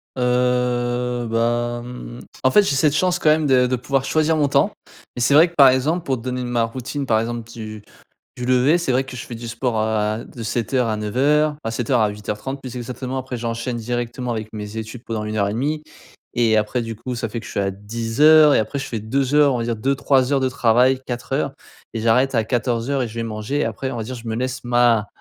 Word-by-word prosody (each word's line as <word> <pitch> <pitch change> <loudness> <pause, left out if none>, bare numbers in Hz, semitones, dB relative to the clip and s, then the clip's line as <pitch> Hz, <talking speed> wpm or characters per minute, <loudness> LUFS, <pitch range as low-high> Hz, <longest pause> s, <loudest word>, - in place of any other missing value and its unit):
Heu, 125 -1 0
bah, 120 +1 0
mmh, 90 - -9 0.2
en 130 - +4
fait, 210 - +7
j'ai 165 -8 0
cette 145 +1 +3
chance, 180 +3 +2
quand 155 - +2
même, 155 -1 +2
de 130 -2 +4
de 125 +1 +1
pouvoir 135 +2 -1
choisir 155 0 +2
mon 145 - +2
temps, - - +2 0.4
mais 125 - -4
c'est 120 - +3
vrai 160 +4 +7
que, 170 - -21
par 140 -2 +8
exemple, 150 +7 +1
pour 130 -2 0
te - - -10
donner 125 +1 -3
n 125 - -4
ma 120 -1 +1
routine, 130 +4 -4
par 110 -2 +3
exemple, 115 0 -4
du 110 -3 -8 0.5
du 125 - -5
lever, 130 +6 +4
c'est 170 - -1
vrai 130 +1 +2
que 130 - -9
je 125 - -6
fais 120 - -7
du 115 +1 -7
sport 115 -1 -1
à 110 0 0
de 115 - -9
7:00 120 +3 0
à 110 - -1
9:00, 145 +8 +1
ah 115 - -2
7:00 120 +1 +1
à 105 - +3
8:30, 105 +6 -5
plus 130 -2 -8
exactement. 125 +2 -5
Après, 130 -1 -5
j'enchaîne 115 +1 -3
directement 120 +1 -3
avec 110 -1 -4
mes 105 0 -7
études 110 +2 -7
pendant 110 -2 -3
1 110 0 -3
heure 100 - +2
et 100 - -2
demie 150 +6 -2 0.5
et 115 -2 +3
après, 110 +3 0
du 115 -1 -5
coup, 125 +2 -5
ça 115 -2 -3
fait 115 - -4
que - - -11
je - - -8
suis - - -2
à 95 - 0
10:00 115 +10 +4
et - - +4
après 110 +6 -2
je 135 - -4
fais 115 - -4
2 130 +6 -1
heures, 145 -2 +5
on - - -1
va - - -1
dire 115 -1 -2
2-3 135 +2 +1
heures 135 - +2
de 130 - +1
travail, 125 +2 +3
4 120 -1 -6
heures - - 0 0.4
et 115 - -3
j'arrête 125 +4 +3
à 115 - +3
14:00 120 +3 -1
et - - -3
je 110 - -11
vais 115 - -2
manger. 115 +6 -2
Après, 115 +4 -3
on - - -5
va 115 - -3
dire, 130 +4 -6
je 115 -1 -9
me 110 - -2
laisse 125 +1 -3
ma 120 -3 +3
120 Hz, 250 wpm, -21 LUFS, 115-130 Hz, 0.5 s, par